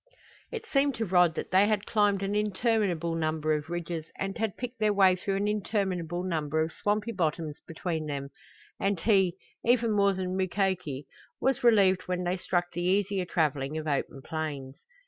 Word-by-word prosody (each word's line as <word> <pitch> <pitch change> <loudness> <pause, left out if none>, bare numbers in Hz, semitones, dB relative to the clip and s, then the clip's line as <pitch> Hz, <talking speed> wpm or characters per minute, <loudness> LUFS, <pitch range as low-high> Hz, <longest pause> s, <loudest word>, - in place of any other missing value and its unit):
It 460 - -5
seemed 275 -1 +2
to 225 - -1
Rod 180 -3 +4
that - - -5
they 190 +2 +5
had 210 -2 0
climbed 205 -2 +2
an 195 +1 -1
interminable 210 -5 +1
number 155 -1 0
of 150 +1 -3
ridges 170 -2 -4
and 195 0 -3
had 220 -3 -2
picked 250 -1 -6
their 215 -1 +3
way 190 -2 +5
through 195 +2 -2
an 200 +1 0
interminable 190 -5 -1
number 160 -4 -1
of 160 - -4
swampy 210 +5 -1
bottoms 160 -5 -2
between 165 -2 -3
them, 140 -1 -4 0.5
and 195 -2 0
he, 190 -4 +3 0.3
even 235 -1 +3
more 200 -1 +3
than 185 -1 -3
Mukoki, 185 -7 -1 0.3
was 265 -1 +1
relieved 200 -6 +4
when 180 0 -1
they 175 +1 0
struck 175 -1 -1
the 175 - -4
easier 190 +1 +1
traveling 150 -3 0
of 155 - -4
open 140 -2 -2
plains. 150 -5 -4
185 Hz, 175 wpm, -28 LUFS, 160-205 Hz, 0.5 s, they